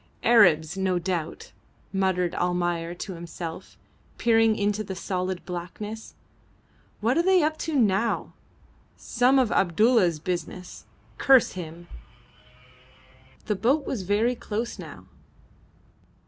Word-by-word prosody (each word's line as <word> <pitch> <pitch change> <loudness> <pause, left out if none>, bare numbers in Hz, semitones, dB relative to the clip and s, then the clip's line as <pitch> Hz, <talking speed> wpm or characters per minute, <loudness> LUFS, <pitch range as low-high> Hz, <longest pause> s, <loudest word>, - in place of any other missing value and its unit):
"Arabs, 175 -8 +5
no 190 -1 0
doubt," 175 -2 -4 0.4
muttered 185 -2 0
Almayer 175 -1 -1
to 190 +2 -6
himself, 170 -1 -8 0.4
peering 225 -1 +3
into 210 0 0
the 190 -2 -6
solid 185 -1 -3
blackness. 200 +5 -7 0.9
"What 240 +8 +2
are - - +5
they 370 -1 +4
up 310 +1 +1
to 320 -2 -3
now? 225 -3 +1 0.6
Some 250 +3 +2
of 255 -4 +2
Abdulla's 195 -1 +3
business; 180 +2 -5 0.3
curse 265 -3 +5
him!" 175 -1 -8 1.6
The 215 - 0
boat 265 +8 +1
was 240 - -3
very 205 +6 +1
close 230 0 -4
now. - - -10
195 Hz, 110 wpm, -25 LUFS, 175-230 Hz, 1.6 s, Arabs